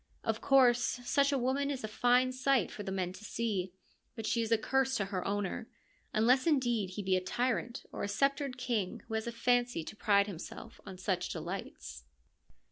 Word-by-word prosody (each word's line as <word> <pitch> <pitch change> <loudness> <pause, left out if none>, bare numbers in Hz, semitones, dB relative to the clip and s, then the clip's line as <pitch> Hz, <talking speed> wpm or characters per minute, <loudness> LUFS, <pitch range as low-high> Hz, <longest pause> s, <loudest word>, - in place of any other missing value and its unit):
Of 220 0 -1
course, 250 -3 +5 0.2
such 280 +2 +3
a 280 - +2
woman 265 +3 0
is 270 -4 -3
a - - -2
fine 245 +4 +3
sight 260 0 +1
for - - -7
the 195 -2 -4
men 185 -2 -2
to 185 +3 -12
see, 205 -4 -2 0.4
but 225 - -5
she 235 - +1
is 225 0 -3
a 230 - +5
curse 265 +3 +1
to 200 - 0
her 190 -2 -3
owner, 205 +2 -2 0.4
unless 250 +6 +3
indeed 240 - +2
he 205 - -2
be 190 0 +2
a 185 - +1
tyrant 240 +3 -2
or - - -3
sceptred 275 +4 0
king 235 -7 -2
who 225 - -7
has 220 +1 -1
a - - -2
fancy 245 -5 +1
to 215 - -8
pride 200 -2 +3
himself 200 +3 -9
on 190 -1 -8
such 185 -1 -1
delights. 155 - -6
225 Hz, 195 wpm, -32 LUFS, 195-255 Hz, 0.4 s, course